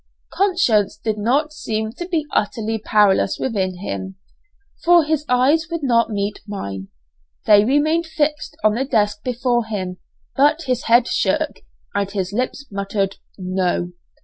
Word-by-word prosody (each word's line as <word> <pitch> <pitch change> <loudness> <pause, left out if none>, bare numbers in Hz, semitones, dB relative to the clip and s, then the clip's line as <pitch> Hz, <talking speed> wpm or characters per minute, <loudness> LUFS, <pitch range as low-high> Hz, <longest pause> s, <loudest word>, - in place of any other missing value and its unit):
Conscience 355 - +2
did 215 -1 -3
not 280 +8 +1
seem 220 -6 -3
to 350 +9 -7
be 330 -4 -1
utterly 220 +1 -1
powerless 205 -2 +3
within 190 -7 -2
him, 190 -1 -5 0.7
for 345 -1 +6
his 305 -1 0
eyes 275 +7 +3
would 335 -3 -4
not 235 -3 +3
meet 205 -1 -2
mine, 100 - -5 0.6
they 205 -1 +7
remained 305 +7 +2
fixed 300 -1 -2
on 215 -1 +4
the 245 +4 0
desk 210 -6 0
before 245 -1 0
him; 190 -4 -4 0.4
but 295 +4 +3
his 255 -3 -1
head 235 +1 +5
shook, - - 0 0.4
and 200 -1 -1
his 195 -1 -3
lips 255 +4 -2
muttered, 195 0 -2 0.2
"No." 185 -2 -1
225 Hz, 145 wpm, -20 LUFS, 200-290 Hz, 0.7 s, they